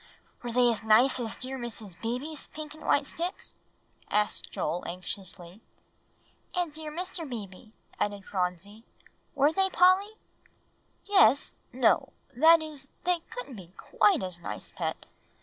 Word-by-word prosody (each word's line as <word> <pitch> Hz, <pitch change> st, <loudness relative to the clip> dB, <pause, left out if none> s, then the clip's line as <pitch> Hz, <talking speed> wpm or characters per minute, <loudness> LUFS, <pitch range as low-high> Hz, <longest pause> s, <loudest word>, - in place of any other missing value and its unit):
"Were 240 Hz, -, -4 dB
they 245 Hz, +1 st, +4 dB
as 225 Hz, -, -2 dB
nice 225 Hz, +5 st, +5 dB
as 230 Hz, -2 st, -3 dB
dear 260 Hz, +1 st, -5 dB
Mrs. 225 Hz, -6 st, -5 dB
Beebe's 255 Hz, +7 st, -4 dB
pink 305 Hz, -1 st, -8 dB
and 310 Hz, -, -13 dB
white 285 Hz, -, +3 dB
sticks?" 345 Hz, +6 st, -4 dB, 0.6 s
asked 210 Hz, 0 st, 0 dB
Joel 175 Hz, -, -2 dB
anxiously. 180 Hz, +1 st, -7 dB, 0.9 s
"And 350 Hz, -4 st, -1 dB
dear 310 Hz, 0 st, -6 dB
Mr. 350 Hz, +1 st, -3 dB
Beebe's," 215 Hz, -2 st, -8 dB, 0.3 s
added 205 Hz, -1 st, -2 dB
Phronsie; 190 Hz, +3 st, -3 dB, 0.5 s
"were 285 Hz, +2 st, +4 dB
they, 385 Hz, +3 st, +2 dB
Polly?" 370 Hz, +3 st, +4 dB, 0.9 s
"Yes 385 Hz, -8 st, +5 dB, 0.2 s
no; 245 Hz, -1 st, +2 dB, 0.2 s
that 320 Hz, +5 st, +7 dB
is, 295 Hz, -3 st, -6 dB, 0.2 s
they 360 Hz, -1 st, +2 dB
couldn't 455 Hz, -, -7 dB
be 180 Hz, -2 st, -12 dB
quite 210 Hz, -2 st, +2 dB
as 180 Hz, -2 st, -4 dB
nice, -, -, -6 dB
Pet. -, -, -4 dB
250 Hz, 135 wpm, -29 LUFS, 205-315 Hz, 0.9 s, that